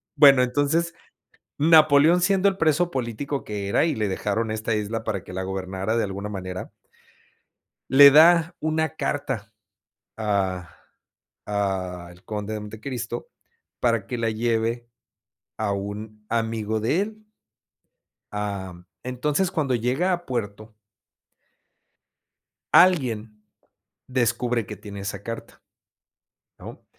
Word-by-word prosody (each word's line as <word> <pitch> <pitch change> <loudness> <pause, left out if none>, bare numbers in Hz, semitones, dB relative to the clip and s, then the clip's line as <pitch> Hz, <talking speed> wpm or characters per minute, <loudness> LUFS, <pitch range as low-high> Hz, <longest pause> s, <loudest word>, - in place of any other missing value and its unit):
Bueno 140 -3 +7
entonces 145 +6 0 0.6
Napoleón 155 +2 +6
siendo 195 +1 +3
el 190 - -6
preso 165 +2 +2
político 130 +3 -3
que 100 -2 -5
era 130 - +3
y 160 - 0
le 105 -2 -1
dejaron 105 +4 -1
esta 110 0 -1
isla 110 +2 -3
para 100 -4 -3
que - - -11
la 95 0 -3
gobernara 95 +3 -3
de - - +2
alguna 100 +1 -4
manera. 95 -2 -6 1.2
Le 140 +1 +10
da 165 +3 +6
una 160 0 -1
carta 115 -9 -3 0.6
a 95 -5 -1 0.8
a 95 -4 -2
el 90 +2 -18
Conde 105 0 -5
de 105 - -3
Montecristo 120 +2 -6 0.5
para 115 -4 +1
que 125 - -3
la 115 -1 0
lleve 115 +1 -1 0.7
a 105 -2 -1
un 105 +2 -6
amigo 110 -1 -1
de 145 - +1
él. 215 +1 -6 1.1
Am, 95 -4 -5 0.2
entonces 145 +8 -1
cuando 135 -5 0
llega 130 +11 0
a 175 0 -4
puerto. 110 -3 -5 2.0
Alguien 115 -12 +3 0.7
descubre 120 -2 0
que - - -7
tiene 100 -1 -9
esa 100 0 -5
carta, 115 +2 -8 1.0
¿no? - - -11
115 Hz, 120 wpm, -24 LUFS, 105-145 Hz, 2.0 s, Le